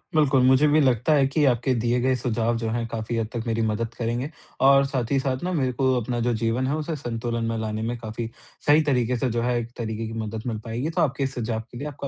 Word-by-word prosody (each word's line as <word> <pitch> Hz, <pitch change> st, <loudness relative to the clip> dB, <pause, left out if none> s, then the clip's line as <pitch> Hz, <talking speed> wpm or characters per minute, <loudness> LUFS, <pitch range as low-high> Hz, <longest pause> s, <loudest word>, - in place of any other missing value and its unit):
बिल्कुल, 140 Hz, -4 st, +4 dB
मुझे 130 Hz, +3 st, +5 dB
भी 150 Hz, +1 st, +4 dB
लगता 130 Hz, +1 st, +3 dB
है 140 Hz, -2 st, +4 dB
कि 150 Hz, +3 st, +1 dB
आपके 125 Hz, +2 st, 0 dB
दिए 120 Hz, +1 st, +2 dB
गए 130 Hz, +1 st, +2 dB
सुझाव 115 Hz, -1 st, 0 dB
जो 115 Hz, -1 st, -2 dB
हैं 115 Hz, +1 st, -1 dB
काफ़ी 115 Hz, +1 st, -3 dB
हद 115 Hz, -1 st, -1 dB
तक 120 Hz, -2 st, -3 dB
मेरी 115 Hz, 0 st, 0 dB
मदद 115 Hz, +2 st, -2 dB
करेंगे 120 Hz, +4 st, -2 dB, 0.4 s
और 140 Hz, 0 st, +6 dB
साथ 130 Hz, -4 st, -2 dB
ही 135 Hz, -, +3 dB
साथ 130 Hz, +1 st, -2 dB
ना 180 Hz, -, -1 dB
मेरे 135 Hz, -6 st, +1 dB
को 130 Hz, -1 st, +4 dB
अपना 120 Hz, +2 st, -2 dB
जो 120 Hz, -, +2 dB
जीवन 120 Hz, +3 st, +1 dB
है 140 Hz, -, 0 dB
उसे 155 Hz, +1 st, -3 dB
संतुलन 115 Hz, -3 st, -3 dB
में 115 Hz, -, -2 dB
लाने 110 Hz, -1 st, -3 dB
में 120 Hz, +2 st, -2 dB
काफ़ी 115 Hz, 0 st, -5 dB, 0.4 s
सही 150 Hz, +2 st, +6 dB
तरीके 125 Hz, -1 st, +1 dB
से 130 Hz, +2 st, 0 dB
जो 115 Hz, 0 st, -1 dB
है 120 Hz, 0 st, +1 dB
एक 115 Hz, 0 st, -6 dB
तरीके 110 Hz, -1 st, -3 dB
की 110 Hz, -, -6 dB
मदद 110 Hz, +1 st, -5 dB
मिल 110 Hz, -3 st, -2 dB
पाएगी, 120 Hz, +6 st, -2 dB
तो 165 Hz, -, 0 dB
आपके 140 Hz, -1 st, +1 dB
इस 135 Hz, 0 st, -2 dB
सुझाव 115 Hz, -2 st, -2 dB
के -, -, -9 dB
लिए 145 Hz, +4 st, -4 dB
आपका 140 Hz, -1 st, -6 dB
120 Hz, 265 wpm, -24 LUFS, 115-135 Hz, 0.4 s, और